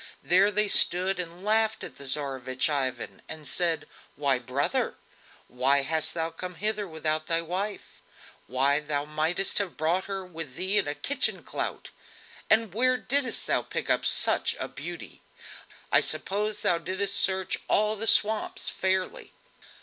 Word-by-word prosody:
There 190 +3 +4
they 210 +1 +4
stood 185 -1 +4
and 175 +2 -6
laughed 220 +1 +1
at - - -9
the 140 - -9
Tsarevich 130 -1 0
Ivan 130 -4 -3
and 155 -2 -7
said: 170 -3 +1 0.3
"Why, 135 -3 +1
brother! 130 +3 -1 0.5
Why 135 +3 +2
hast 160 +3 -1
thou 165 0 -2
come 180 +2 -7
hither 210 +2 -1
without 155 -1 -2
thy 165 -1 +1
wife? 190 +5 -5 0.5
Why, 135 +3 +2
thou 145 -1 -2
mightest 155 +7 +1
have 195 -4 -4
brought 165 +4 0
her 195 -1 -5
with 165 -7 -7
thee 190 +5 +3
in 195 - -1
a 145 - -3
kitchen 280 - -1
clout. - - -5 0.6
And 220 -3 +3
where 255 +3 +2
didst 265 +3 -1
thou - - +1
pick - - -3
up - - +1
such - - +2
a - - -3
beauty? - - -9 0.7
I - - +6
suppose 210 +1 0
thou 170 - +4
didst 190 +3 0
search 190 -1 +1
through - - -21
all 215 +1 +2
the 220 +2 -1
swamps 215 0 +3
fairly?" 190 0 -2
180 Hz, 155 wpm, -27 LUFS, 150-205 Hz, 0.7 s, I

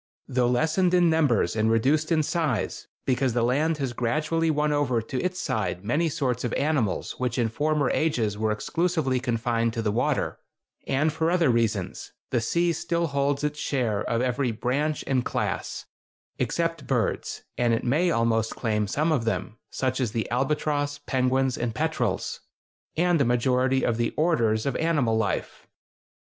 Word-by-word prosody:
Though 125 -1 +1
lessened 160 +8 +2
in 175 -2 +4
numbers 135 - +2
and 110 0 +2
reduced 140 +8 +2
in 155 -2 +3
size, 150 - -1 0.2
because 130 -1 +1
the 120 -1 +1
land 150 +6 +1
has 135 -4 -2
gradually 155 +7 0
won 150 -1 +1
over 140 -5 +1
to 125 +4 -4
its 180 0 -2
side 100 -3 -2
many 155 +9 +1
sorts 130 -6 -1
of 120 - -2
animals 140 -9 -1
which 125 -1 -1
in 115 -2 +1
former 145 +4 0
ages 120 -10 0
were 110 +1 0
exclusively 155 - 0
confined 115 -1 0
to 115 - -2
the 105 - +1
water, 120 +4 0 0.5
and 150 +3 +1
for 160 +1 0
other 170 -6 +3
reasons, 110 -5 -1 0.2
the 120 - +1
sea 170 +8 +1
still 170 +2 -1
holds 140 -1 0
its 150 0 -2
share 120 -9 0
of 115 +1 0
every 125 0 0
"branch" 140 +7 -1
and 130 -2 +1
"class" - - -3 0.5
(except 165 0 -1
birds, 125 -4 -1
and 120 -1 +1
it 115 - 0
may 150 +9 +2
almost 115 -6 +1
claim 105 -3 0
some 155 +10 0
of 130 -7 +1
them, 105 +2 -2
such 130 0 -1
as 115 -4 -1
the 115 -2 -1
albatross, 145 +2 0
penguins, 130 0 +1
and 115 -2 -2
petrels), 140 -11 -1 0.6
and 175 -2 +3
a - - +5
majority 130 +2 +2
of 115 - +1
the 120 -1 -1
"orders" 115 -10 +2
of 140 - -1
animal 145 -9 +1
life. 110 -3 -2
130 Hz, 165 wpm, -26 LUFS, 115-155 Hz, 0.6 s, a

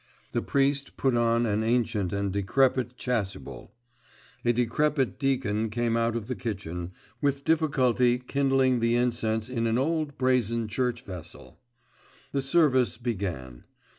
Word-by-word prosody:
The - - 0
priest 140 0 0
put 135 -2 +1
on 115 0 +2
an 110 0 0
ancient 110 -5 0
and 100 -1 -1
decrepit 125 +4 +1
chasuble; 110 -6 -4 0.7
a 120 - +3
decrepit 130 +3 0
deacon 120 -6 0
came 120 +1 0
out 115 0 +1
of 115 -3 -3
the 125 - -3
kitchen, 90 -7 -5 0.3
with 140 -1 0
difficulty 130 -6 +3
kindling 135 0 +1
the 115 +1 +2
incense 115 -2 0
in 115 -2 -1
an 115 +1 +1
old 155 +1 -1
brazen 115 -3 +1
church 120 +2 -1
vessel. 90 -4 -10 0.7
The 140 - 0
service 135 -3 +3
began. 90 - -4
120 Hz, 135 wpm, -27 LUFS, 110-135 Hz, 0.7 s, a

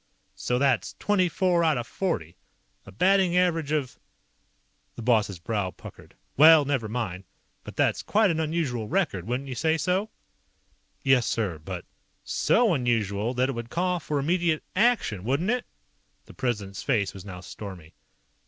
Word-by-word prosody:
"So 125 - -1
that's 135 -2 +1
twenty 190 -4 +2
four 175 0 +2
out 155 -4 +3
of 120 - -3
forty. 90 - -3 0.5
A - - -10
batting 185 - +3
average 165 -5 +1
of 145 -5 -2 0.5
" - - -43
The 120 - -7
boss's 110 -5 +2
brow 100 +2 -2
puckered. - - -13 0.2
"Well. 155 0 +8
Never 135 -6 -1
mind. 100 -5 -4 0.4
But - - -10
that's - - +1
quite 210 -2 +2
an 160 - -1
unusual 150 -8 -1
record, 145 - -1
wouldn't 125 +3 -2
you 130 - -4
say 160 +6 +1
so?" 185 +6 0 0.9
"Yes, 130 -3 +3
sir, 95 -9 -1
but 75 - -7 0.3
" - - -44 0.2
"So 230 -5 +4
unusual 115 - 0
that 130 +2 +1
it - - -1
would 115 -1 -6
call 180 +3 0
for 150 -2 -3
immediate 165 +2 +1
ACTION, 210 - +2
wouldn't 140 - 0
it?" 250 0 -2 0.6
The - - -14
President's 105 -7 -3
face 105 -8 0
was 95 - -10
now 95 -3 -8
stormy. 90 -4 -10
135 Hz, 160 wpm, -26 LUFS, 110-170 Hz, 0.9 s, Well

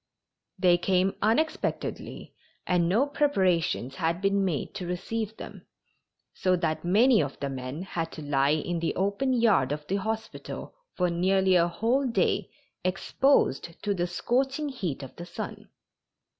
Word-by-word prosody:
They 180 -2 +4
came 185 +1 +2
unexpectedly 235 +10 -1 0.3
and 175 -2 +2
no 225 +9 +3
preparations 185 - +1
had 165 +1 0
been 195 0 +2
made 170 -7 -2
to 180 - -5
receive 215 +5 -3
them, - - -10 0.7
so 185 -1 +2
that 165 -3 -1
many 215 +5 +5
of 140 -2 -4
the 140 - -2
men 130 +5 -5
had 165 -3 -4
to 155 - -7
lie 140 -1 +2
in 170 +2 -2
the 165 - -1
open 200 +8 0
yard 220 - +3
of 150 0 -3
the 195 +6 -1
hospital 220 +2 -5 0.2
for 180 -1 +1
nearly 190 +2 +2
a 170 -1 +5
whole 235 +10 +1
day 235 - +1 0.3
exposed 185 - +1
to 205 -1 +1
the 175 -2 -1
scorching 265 - 0
heat 180 - -4
of 130 - -10
the 175 - -7
sun. 175 - -7
185 Hz, 150 wpm, -27 LUFS, 170-220 Hz, 0.7 s, many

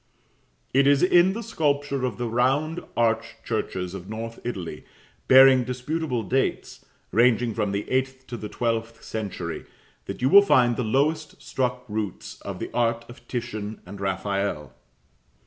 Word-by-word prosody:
It 135 +1 +4
is 140 +1 +4
in 180 +1 +5
the 230 +3 -5
sculpture 145 - 0
of 125 - -3
the 120 -1 -2
round 135 +8 +1 0.2
arched 115 -1 0
churches 95 -5 -3
of 95 0 -8
North 115 +1 -6
Italy, 90 -10 -5 0.4
bearing 130 -1 +8
disputable 125 +1 -2
dates, 130 +7 -1 0.3
ranging 120 0 +3
from 105 -2 -1
the 100 +1 -3
eighth 130 0 -1
to 125 - -7
the 105 -1 -6
twelfth 115 -1 -2
century, 95 -6 -5 0.4
that - - -6
you 125 - +2
will 200 +9 +9
find 125 -11 +4
the 125 - -1
lowest 150 +7 0
struck 125 -1 -2
roots 105 -3 -5
of - - -6
the - - -6
art 115 -1 0
of 120 0 -14
Titian 110 -3 -4
and 100 +2 -9
Raphael. 95 -5 -2
120 Hz, 150 wpm, -25 LUFS, 110-135 Hz, 0.4 s, will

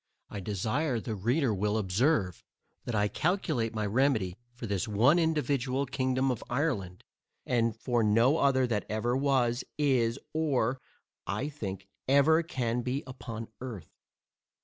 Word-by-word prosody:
I 105 - -5
desire 110 - -1
the 110 0 -4
reader 120 - +1
will 105 +2 0
observe, 100 - +1 0.4
that 120 - -2
I 105 0 +3
calculate 150 - -1
my 110 -1 -1
remedy 110 -5 +1 0.2
for 120 0 -8
this 100 +1 -1
one 120 +11 +4
individual 140 -5 0
Kingdom 130 -1 0
of 120 - -4
Ireland, 120 - -1 0.4
and 115 -2 +1
for 120 -1 +1
no 115 +8 +4
other 130 -2 +3
that 110 -4 -2
ever 115 +3 0
was, 130 -3 +1
is, 130 -5 +2 0.2
or, 135 -5 0 0.5
I 145 - -2
think, 95 -9 -6 0.2
ever 140 +4 +5
can 125 -7 -2
be 130 +3 -2
upon 115 -3 -7
Earth. 115 -10 -7
120 Hz, 140 wpm, -30 LUFS, 110-140 Hz, 0.5 s, ever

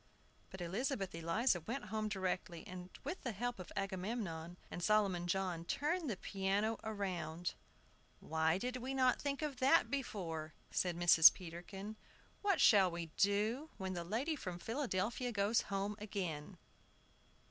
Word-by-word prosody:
But 190 - -8
Elizabeth 195 +3 -1
Eliza 170 +5 +1
went 235 - -4
home 215 -1 0
directly, 185 -4 -2
and, 180 0 -8
with 370 - -4
the 240 - -3
help 240 +2 -3
of 185 - -8
Agamemnon 190 -3 -3
and 175 - -5
Solomon 195 -3 +2
John, 180 -2 -1
turned 305 - -1
the 210 - -2
piano 200 +4 0
round. 180 -6 -3 0.7
"Why 160 +2 +1
did 250 +5 -2
we 260 +2 -4
not 255 -2 +3
think 285 +1 -2
of 290 -4 -2
that 260 -3 +4
before?" 165 - -3 0.2
said 175 -2 0
Mrs. 170 -2 +9
Peterkin. 190 +4 -8 0.4
"What 400 -4 +2
shall 195 -4 +7
we 170 -2 -5
do 215 +9 +2
when 190 -1 -3
the 175 -1 -3
lady 240 - -1
from 180 -10 -5
Philadelphia 235 +1 -1
goes 205 +1 +2
home 200 +1 -1
again?" 180 -8 -4
195 Hz, 145 wpm, -37 LUFS, 175-235 Hz, 0.7 s, Mrs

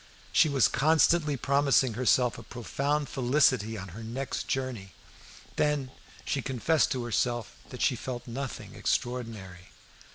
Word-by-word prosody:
She 155 - +5
was 135 -4 +4
constantly 155 0 +3
promising 140 -2 +2
herself 125 0 +2
a - - -8
profound 140 +6 -2
felicity 125 -4 +2
on 95 -1 -7
her 105 +7 -9
next 120 +4 -4
journey. 125 -8 -3 0.6
Then 145 -3 0 0.3
she 140 - -1
confessed 135 +5 +1
to 125 -2 -3
herself 120 0 -1
that 125 - -4
she 130 - +3
felt 120 +1 -6
nothing 130 +2 -6
extraordinary. 110 -8 -3
125 Hz, 130 wpm, -28 LUFS, 115-140 Hz, 0.6 s, She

